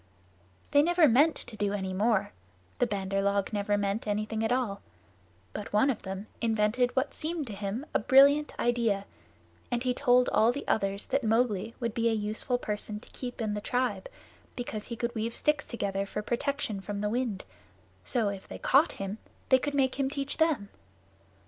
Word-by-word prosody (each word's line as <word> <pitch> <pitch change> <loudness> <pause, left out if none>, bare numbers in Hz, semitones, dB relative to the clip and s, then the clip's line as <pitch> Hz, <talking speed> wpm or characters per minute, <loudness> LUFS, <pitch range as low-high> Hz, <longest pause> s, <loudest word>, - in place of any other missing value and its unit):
They 285 - +6
never 345 0 +5
meant 290 +6 +5
to 220 - -8
do 205 -1 -1
any 190 -2 -2
more 210 +1 +1 0.5
the 245 - +3
Bandar 195 -2 -1
log 200 +1 0
never 205 0 +1
mean 200 +1 0
anything 215 +1 -1
at 225 - 0
all; 240 -6 0 0.7
but 210 - -6
one 215 +7 +4
of 245 - -5
them 190 +1 -6 0.2
invented 230 +2 +1
what 265 +2 0
seemed 315 -1 -3
to 220 - -7
him 200 +7 -4
a - - +3
brilliant 280 +6 +5
idea, 230 -5 +1 0.6
and 240 0 -1
he 250 -1 +1
told 250 -1 +4
all 225 +2 +4
the 280 +3 -6
others 200 -1 0
that 275 0 0
Mowgli 225 -1 +1
would 235 -3 -2
be 230 0 +2
a - - +1
useful 215 +3 -1
person 210 -2 -4
to - - -17
keep 245 -1 -6
in 210 -1 -1
the 210 - -3
tribe, 245 -4 -1 0.5
because 220 -4 -5
he 235 - -5
could 235 +1 -2
weave 230 0 -3
sticks 300 0 +1
together 200 -4 -2
for 210 +1 -4
protection 240 -4 -2
from 205 +1 -4
the 210 - 0
wind; 230 -4 -2 0.6
so, 230 -5 0
if 195 -1 -7
they - - -7
caught 275 +4 +4
him, 195 +2 -5 0.3
they 260 - +6
could 285 +2 -3
make 265 -1 +1
him 270 -1 +1
teach 280 -1 -3
them. 300 -11 +1
225 Hz, 185 wpm, -29 LUFS, 205-255 Hz, 0.7 s, They